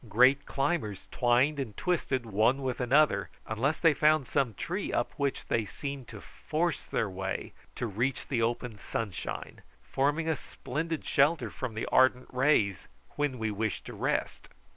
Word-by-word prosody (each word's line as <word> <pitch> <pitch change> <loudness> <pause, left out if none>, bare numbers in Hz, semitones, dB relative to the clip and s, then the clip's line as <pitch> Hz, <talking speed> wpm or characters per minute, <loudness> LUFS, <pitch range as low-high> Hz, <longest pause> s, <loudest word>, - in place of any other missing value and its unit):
Great 130 +6 +5
climbers 135 - -1
twined 125 +4 +3
and 115 -6 -4
twisted 140 -8 0
one 115 +6 +2
with 130 -1 -2
another, 140 +5 +3 0.2
unless 130 +8 0
they 165 -3 +5
found 150 -2 +3
some 130 -7 0
tree 190 - -3
up 120 - 0
which 140 -1 -1
they 115 - +1
seemed 140 +4 -6
to 105 - -9
force 165 - -2
their 110 - 0
way 95 0 -4 0.2
to - - -2
reach 120 +5 -1
the 120 -4 0
open 115 -1 -1
sunshine, 105 -6 -5 0.2
forming 145 - 0
a 160 - +2
splendid 160 +4 -4
shelter 150 +3 +2
from 125 -4 -5
the 110 - -2
ardent 130 -1 +4
rays 125 -8 +2 0.3
when 145 -3 0
we 110 -2 -1
wished 105 -1 -2
to - - -7
rest. - - -2
130 Hz, 160 wpm, -30 LUFS, 110-145 Hz, 0.3 s, Great